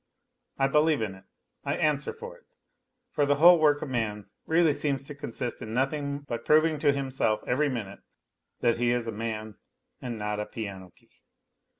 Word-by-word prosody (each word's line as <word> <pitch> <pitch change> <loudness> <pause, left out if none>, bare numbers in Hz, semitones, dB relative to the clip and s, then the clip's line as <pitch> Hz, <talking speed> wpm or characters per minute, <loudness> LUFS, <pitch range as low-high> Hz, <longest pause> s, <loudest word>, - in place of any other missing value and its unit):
I 135 - +3
believe 150 -2 +3
in 100 -3 -3
it, 95 0 -16 0.4
I - - -1
answer 150 -2 0
for 475 +1 -9
it, - - -22 0.7
for 145 - +1
the 145 - +3
whole 170 +4 +7
work 145 -2 +3
of 150 - -5
man 105 -5 -3 0.2
really 160 -1 +4
seems 140 -2 -1
to 145 - -7
consist 120 -4 -4
in 110 +1 -5
nothing 140 +2 -1
but 115 0 -4
proving 155 0 +3
to 145 -1 +4
himself 130 -6 -1
every 145 +4 +1
minute 110 -7 -5 0.6
that 115 -1 +2
he 120 0 +1
is 120 -1 0
a - - -2
man 110 -1 -5 0.4
and 120 -2 -5
not 105 0 -3
a 105 - -3
piano 100 -4 -7
key - - -30
130 Hz, 185 wpm, -28 LUFS, 110-150 Hz, 0.7 s, whole